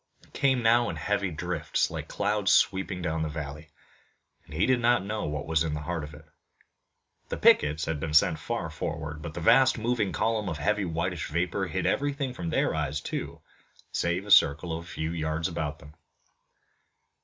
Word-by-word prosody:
It - - -24
came 130 -3 +2
now 120 +1 +4
in - - -4
heavy 100 -2 -1
drifts 85 -1 -1
like - - -5
clouds 105 -2 0
sweeping 95 -2 +2
down 80 -1 -1
the 80 - -1
valley, 75 +1 -7 0.7
and - - -19
he 85 - +2
did 130 -1 +3
not 120 -3 +2
know 105 +1 -3
what 75 -1 -3
was 80 0 +1
in 80 -2 -2
the 75 - -4
heart 80 +1 -3
of 75 +1 -9
it. 75 +1 -15 1.0
The - - -3
pickets 75 +1 +4
had 80 -2 -2
been 75 0 -3
sent - - +4
far - - -3
forward, 75 -1 -5
but 80 -1 -7
the 85 - -4
vast 130 +9 +5
moving 115 -3 0
column 110 -3 0
of 80 - -4
heavy 105 +6 0
whitish 85 +1 -2
vapor 85 +3 -1
hid - - -2
everything 140 -2 0
from 85 -8 -4
their - - +1
eyes, 75 -1 -2
too, - - -5 0.5
save 85 +3 -1
a 105 - -5
circle 80 +2 +5
of 85 +1 -7
a - - -15
few 80 -3 -4
yards 80 0 -1
about 75 -4 -3
them. 75 -1 -15
85 Hz, 190 wpm, -28 LUFS, 75-105 Hz, 1.0 s, vast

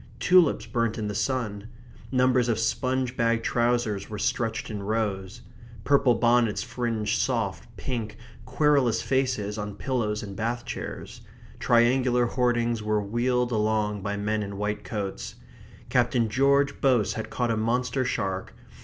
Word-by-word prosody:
Tulips 180 +4 +4
burnt 115 -3 -1
in 110 -2 -3
the 105 - -3
sun. 105 -1 -2 0.4
Numbers 125 -1 +3
of 115 - +1
sponge 130 +2 -1
bag 115 -1 +1
trousers 120 -4 0
were 105 - -5
stretched 115 +2 -1
in 105 -2 -4
rows. 100 -3 -2 0.4
Purple 135 -1 +4
bonnets 120 -2 +2
fringed 120 -3 -2
soft, - - -1
pink, 115 -5 -4 0.3
querulous 130 -4 +2
faces 125 -6 -1
on 105 -1 -5
pillows 110 -4 -2
in 100 -1 -7
bath 120 +4 -3
chairs. - - -7 0.4
Triangular 125 +1 +3
hoardings 120 -2 0
were 105 0 0
wheeled 120 +4 0
along 105 -2 0
by 100 +1 -3
men 105 +1 -1
in 100 -1 -5
white 105 +1 -2
coats. 95 - -5 0.5
Captain 120 -2 +2
George 140 +3 +2
Boase 125 -6 +3
had 110 - -5
caught 120 -2 -1
a - - +1
monster 125 +3 0
shark. 95 -6 -3
115 Hz, 140 wpm, -26 LUFS, 105-125 Hz, 0.5 s, Tulips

